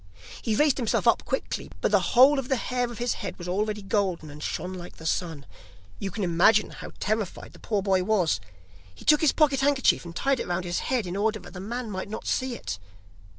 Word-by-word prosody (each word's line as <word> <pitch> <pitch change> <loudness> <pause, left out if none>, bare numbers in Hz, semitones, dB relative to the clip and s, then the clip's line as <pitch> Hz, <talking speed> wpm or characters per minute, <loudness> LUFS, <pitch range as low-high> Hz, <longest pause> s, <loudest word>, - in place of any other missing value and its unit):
He 220 - 0
raised 295 +2 +3
himself 235 -5 0
up - - +4
quickly, - - -3
but - - +1
the - - +5 0.2
whole 270 +3 +8
of 260 - -4
the 265 - +3
hair 245 0 -1
of 235 - -8
his 240 +2 0
head 200 - -5
was 175 - -7
already 210 +3 -1
golden 190 -7 -1
and 150 +1 -11
shone 180 +5 -3
like 175 -1 -8
the 160 - -12
sun. 160 -3 -2 0.5
You 195 - -3
can 205 +2 -4
imagine 185 +5 +4
how - - -9
terrified 215 -2 -2
the - - -15
poor 205 -3 -1
boy 190 -2 +2
was! 185 - +2 0.6
He - - -14
took 300 -1 +5
his 315 - +5
pocket 290 -4 +3
handkerchief 275 -1 +3
and 170 -1 -9
tied 270 +4 +1
it - - -3
round 180 0 -1
his 175 0 -1
head, 250 -5 +1
in 180 +1 -4
order 215 +2 +1
that - - -12
the 185 - -7
man 230 +3 -4
might 185 +1 -4
not 215 - -6
see 255 -1 -1
it. 90 -3 -5
210 Hz, 230 wpm, -26 LUFS, 180-245 Hz, 0.6 s, whole